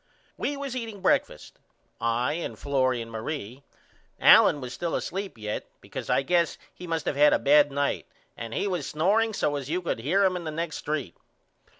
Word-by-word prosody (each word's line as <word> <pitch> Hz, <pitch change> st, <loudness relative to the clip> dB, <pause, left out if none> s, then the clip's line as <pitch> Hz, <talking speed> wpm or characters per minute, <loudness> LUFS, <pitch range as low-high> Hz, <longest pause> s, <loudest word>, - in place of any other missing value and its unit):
We 285 Hz, -, -2 dB
was 275 Hz, -2 st, -5 dB
eating 225 Hz, -5 st, -5 dB
breakfast 190 Hz, -, 0 dB, 0.4 s
I 115 Hz, +4 st, 0 dB
and 170 Hz, +2 st, -4 dB
Florrie 130 Hz, -4 st, 0 dB
and 115 Hz, -, -12 dB
Marie. 120 Hz, +2 st, -5 dB, 0.6 s
Allen 145 Hz, -, +7 dB
was 125 Hz, -2 st, -6 dB
still 170 Hz, +6 st, -2 dB
asleep 195 Hz, -, -4 dB
yet 105 Hz, -1 st, -4 dB
because -, -, -8 dB
I 135 Hz, -, +3 dB
guess 170 Hz, 0 st, +1 dB, 0.2 s
he 180 Hz, -, -10 dB
must 165 Hz, -1 st, -2 dB
of -, -, 0 dB
had 150 Hz, +1 st, +6 dB
a -, -, +4 dB
bad 145 Hz, 0 st, +5 dB
night 140 Hz, 0 st, -1 dB, 0.3 s
and 115 Hz, 0 st, -7 dB
he -, -, 0 dB
was 180 Hz, -7 st, -2 dB
snoreing 210 Hz, +8 st, +2 dB
so 145 Hz, -, 0 dB
as 140 Hz, -1 st, -6 dB
you 175 Hz, +3 st, 0 dB
could 170 Hz, -10 st, -3 dB
hear 175 Hz, +12 st, +2 dB
him 185 Hz, -1 st, +2 dB
in 180 Hz, -, -4 dB
the 160 Hz, -, -4 dB
next 160 Hz, 0 st, -4 dB
st. 145 Hz, -, -3 dB
150 Hz, 195 wpm, -26 LUFS, 130-180 Hz, 0.6 s, Allen